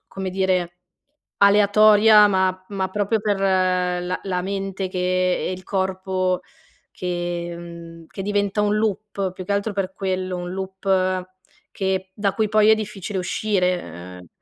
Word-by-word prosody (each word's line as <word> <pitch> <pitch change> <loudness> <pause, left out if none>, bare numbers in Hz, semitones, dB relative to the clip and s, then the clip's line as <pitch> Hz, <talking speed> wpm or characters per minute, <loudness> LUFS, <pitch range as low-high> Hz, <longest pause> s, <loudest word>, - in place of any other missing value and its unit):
come 190 -1 -5
dire, 185 -2 0 0.6
aleatoria, 210 +1 +6
ma 185 -1 0
ma 190 -2 -2
proprio 205 +3 0
per 205 -2 0
la 185 -2 +1
la 185 -2 -1
mente 195 0 -3
che 185 0 -4 0.5
e - - -2
il 185 0 -9
corpo 185 -1 -1 0.5
che, 175 -1 -3
mhmm, 170 -1 -10
che 195 - -7
diventa 205 0 -1
un 210 0 +1
loop 205 -2 -1
più 185 0 -9
che 200 - -3
altro 200 +2 -1
per 190 -1 -2
quello, 185 -1 -2
un 175 0 -5
loop 190 -1 -1 0.4
che 190 -1 -2
da 200 -1 -1
cui 215 0 0
poi 215 0 +4
è 220 - +7
difficile 210 -2 -5
uscire, 180 - -2
uhm 90 - -14
190 Hz, 145 wpm, -22 LUFS, 180-200 Hz, 0.6 s, è